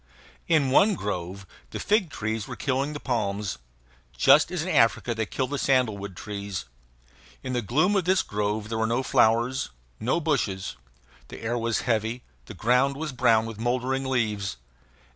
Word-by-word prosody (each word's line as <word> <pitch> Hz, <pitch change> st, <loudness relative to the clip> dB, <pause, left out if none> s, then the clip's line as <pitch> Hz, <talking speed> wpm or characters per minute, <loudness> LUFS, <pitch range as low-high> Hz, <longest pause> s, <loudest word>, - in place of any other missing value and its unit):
In 150 Hz, -5 st, +3 dB
one 200 Hz, +9 st, +5 dB
grove 95 Hz, -, -4 dB, 0.2 s
the -, -, -6 dB
fig 210 Hz, -4 st, +2 dB
trees 110 Hz, -4 st, -3 dB
were -, -, -6 dB
killing 140 Hz, +2 st, -1 dB
the 145 Hz, -, -5 dB
palms, 100 Hz, -, -2 dB, 0.6 s
just -, -, +6 dB
as -, -, -2 dB
in -, -, -5 dB
Africa 120 Hz, -, +3 dB
they 110 Hz, -2 st, -2 dB
kill 130 Hz, -, -1 dB
the 140 Hz, +2 st, -3 dB
sandalwood 105 Hz, -8 st, 0 dB
trees. 100 Hz, -7 st, -5 dB, 0.8 s
In 130 Hz, -, -3 dB
the 120 Hz, -, 0 dB
gloom 155 Hz, -, +2 dB
of 190 Hz, -3 st, +1 dB
this 185 Hz, +1 st, +3 dB
grove 105 Hz, +1 st, -2 dB
there 110 Hz, -1 st, -2 dB
were 110 Hz, -, +1 dB
no 120 Hz, +3 st, 0 dB
flowers, 120 Hz, +3 st, +2 dB, 0.3 s
no 125 Hz, +9 st, +1 dB
bushes; 110 Hz, -, -1 dB, 0.5 s
the -, -, -10 dB
air 115 Hz, +2 st, -1 dB
was 115 Hz, -1 st, 0 dB
heavy; 115 Hz, +1 st, -1 dB, 0.2 s
the -, -, -9 dB
ground 125 Hz, +4 st, +2 dB
was 155 Hz, +1 st, -4 dB
brown 115 Hz, -3 st, +3 dB
with 115 Hz, -2 st, -7 dB
mouldering 130 Hz, +3 st, -1 dB
leaves. 105 Hz, -, -1 dB
120 Hz, 165 wpm, -26 LUFS, 105-135 Hz, 0.8 s, just